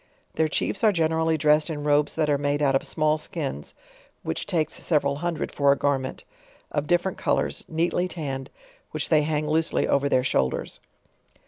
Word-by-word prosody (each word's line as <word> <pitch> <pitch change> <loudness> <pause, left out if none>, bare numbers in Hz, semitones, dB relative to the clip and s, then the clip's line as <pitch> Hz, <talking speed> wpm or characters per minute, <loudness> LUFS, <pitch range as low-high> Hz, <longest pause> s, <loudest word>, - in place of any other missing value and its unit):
Their 160 - +1
Chiefs 190 +6 -2
are 215 - +6
generally 160 -2 +1
dres&ed 150 +2 +3
in 145 -2 -4
robes 145 0 +2
that 155 -2 +1
are 145 -1 +1
made 145 +1 0
out 135 -1 +3
of 135 - -1
email 155 0 +2
skins, 140 - -5 0.5
(which 80 - -3
takes 170 -6 -1
several 140 -3 +1
hundred 170 +1 -3
for 140 -1 +3
a 140 - +2
garment,) 135 -2 -1 0.5
of 145 0 -2
different 175 +3 +1
colors, - - 0
neatly 170 +2 0
tanned, 140 -6 -5 0.4
which - - -3
they 155 -2 +4
ha.ng 150 0 -1
loosely 160 +1 +1
over 140 0 +2
their 130 - +2
shoulders. 65 - -1
150 Hz, 175 wpm, -25 LUFS, 140-160 Hz, 0.5 s, are